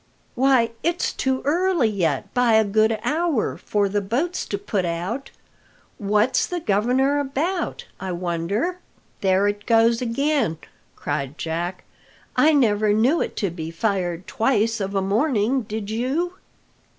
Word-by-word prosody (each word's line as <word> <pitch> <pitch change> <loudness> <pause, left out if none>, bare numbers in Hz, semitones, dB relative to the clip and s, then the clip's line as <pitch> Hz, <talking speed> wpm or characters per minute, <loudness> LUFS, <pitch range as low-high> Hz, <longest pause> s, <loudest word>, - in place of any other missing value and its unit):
"Why, 255 -3 +3
it's 345 +1 0
too 265 0 -1
early 345 -2 +2
yet 170 -10 -1
by 245 -2 +3
a 220 0 +6
good 215 +2 +2
hour 320 -5 0
for 205 -1 0
the 205 +1 -1
boats 275 - -2
to 200 - -2
put 200 -1 -2
out. 180 +10 -3 0.7
What's 210 +5 +2
the 355 - -3
governor 255 +4 +2
about, 300 +7 -2
I 190 -1 -4
wonder?" 180 - -2 0.4
"There 190 +1 +3
it 205 0 -3
goes 230 0 +4
again!" 250 - 0 0.4
cried 145 0 -3
Jack. 175 +3 -3 0.5
"I 310 - +5
never 215 -7 +3
knew 250 +10 +3
it - - -3
to 190 - -1
be 160 -2 -6
fired 180 -1 -2
twice 225 -1 +1
of 195 +1 -3
a 195 - +1
morning, 230 +3 +1
did 215 -1 -5
you?" 270 +11 -1
220 Hz, 140 wpm, -23 LUFS, 195-270 Hz, 0.7 s, a